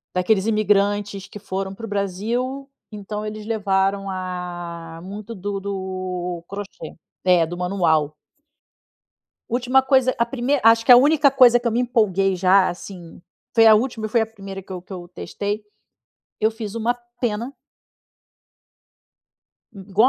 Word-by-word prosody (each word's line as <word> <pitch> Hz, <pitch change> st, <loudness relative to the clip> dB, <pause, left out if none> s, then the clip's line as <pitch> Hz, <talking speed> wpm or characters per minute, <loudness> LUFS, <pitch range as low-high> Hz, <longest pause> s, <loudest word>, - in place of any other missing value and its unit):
Daqueles 190 Hz, +2 st, +2 dB
imigrantes 205 Hz, -2 st, +1 dB
que -, -, -10 dB
foram 195 Hz, -1 st, -4 dB
para 225 Hz, +4 st, -8 dB
o -, -, -9 dB
Brasil, 225 Hz, +8 st, -2 dB, 0.2 s
então 210 Hz, 0 st, -6 dB
eles 215 Hz, 0 st, -6 dB
levaram 195 Hz, -2 st, 0 dB
a 175 Hz, -3 st, -6 dB
muito 210 Hz, +4 st, -8 dB
do 200 Hz, +1 st, -4 dB
do 185 Hz, -3 st, -4 dB
crochê. 200 Hz, -5 st, -8 dB, 0.3 s
É, 180 Hz, -2 st, +4 dB
do 170 Hz, +2 st, -6 dB
manual. 170 Hz, -5 st, +1 dB, 1.4 s
Última 250 Hz, +2 st, +3 dB
coisa 260 Hz, -1 st, +3 dB
a 235 Hz, -, +3 dB
primei 265 Hz, +3 st, 0 dB
acho 225 Hz, 0 st, +5 dB
que -, -, +6 dB
a -, -, +12 dB
única 285 Hz, +2 st, +5 dB
coisa 250 Hz, -3 st, +6 dB
que 240 Hz, -, -2 dB
eu -, -, +1 dB
me 235 Hz, -, 0 dB
empolguei 200 Hz, -6 st, +1 dB
já, 185 Hz, +1 st, +4 dB
assim, 175 Hz, -1 st, -9 dB, 0.4 s
foi 225 Hz, -1 st, +6 dB
a 220 Hz, -, +9 dB
última 225 Hz, 0 st, 0 dB
e -, -, -4 dB
foi 230 Hz, +1 st, +2 dB
a -, -, +1 dB
primeira 195 Hz, -3 st, -9 dB
que 190 Hz, -, -14 dB
eu 185 Hz, -, -4 dB
que 185 Hz, +2 st, -12 dB
eu 175 Hz, -1 st, -8 dB
testei. 205 Hz, +4 st, -5 dB, 0.8 s
Eu 220 Hz, -, +3 dB
fiz 220 Hz, -2 st, -7 dB
uma 230 Hz, +1 st, 0 dB, 0.3 s
pena 235 Hz, +3 st, -2 dB, 2.2 s
i 200 Hz, -, -12 dB
igual 200 Hz, +5 st, +3 dB
205 Hz, 150 wpm, -22 LUFS, 185-230 Hz, 2.2 s, a